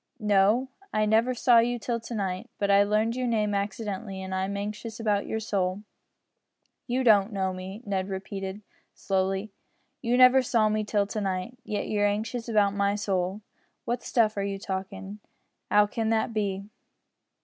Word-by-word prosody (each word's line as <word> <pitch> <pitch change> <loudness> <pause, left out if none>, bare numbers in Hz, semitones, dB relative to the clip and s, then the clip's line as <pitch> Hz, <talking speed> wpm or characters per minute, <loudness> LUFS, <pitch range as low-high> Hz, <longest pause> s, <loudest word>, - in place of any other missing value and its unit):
"No. 210 +4 +3 0.2
I 215 0 +2
never 225 +4 +3
saw 240 0 +5
you 240 +1 +1
till 235 +1 -2
to 230 +1 -7
night, 190 -3 -3
but 200 -1 +1
I 200 0 +6
learned 215 +3 +1
your 255 -1 -1
name 215 -3 +1
accidentally, 200 0 -3
and 190 0 -5
I'm 190 +1 -1
anxious 210 +2 -5
about 210 -3 0
your 220 - -2
soul." 195 -2 -1 1.0
"You 255 +1 0
don't 210 -3 +5
know 190 -2 -1
me," 190 +5 -8
Ned 195 -1 -2
repeated, 195 +1 -5 0.3
slowly, 195 +2 -1 0.5
"you 245 0 +1
never 255 +1 +7
saw 230 -3 +2
me 215 0 0
till 205 -1 +1
to 210 +1 -4
night, 190 +4 -2
yet 210 - -3
you're 205 -1 +2
anxious 220 +3 -3
about 205 -3 +3
my 200 0 +1
soul! 195 -1 -1 0.4
What 240 +1 -1
stuff 220 -3 +2
are 200 - 0
you 200 0 -2
talkin'! 195 +1 -5 0.5
'Ow 210 0 +5
can 220 +1 -2
that 225 0 +1
be?" 200 -2 -2
210 Hz, 170 wpm, -27 LUFS, 195-225 Hz, 1.0 s, never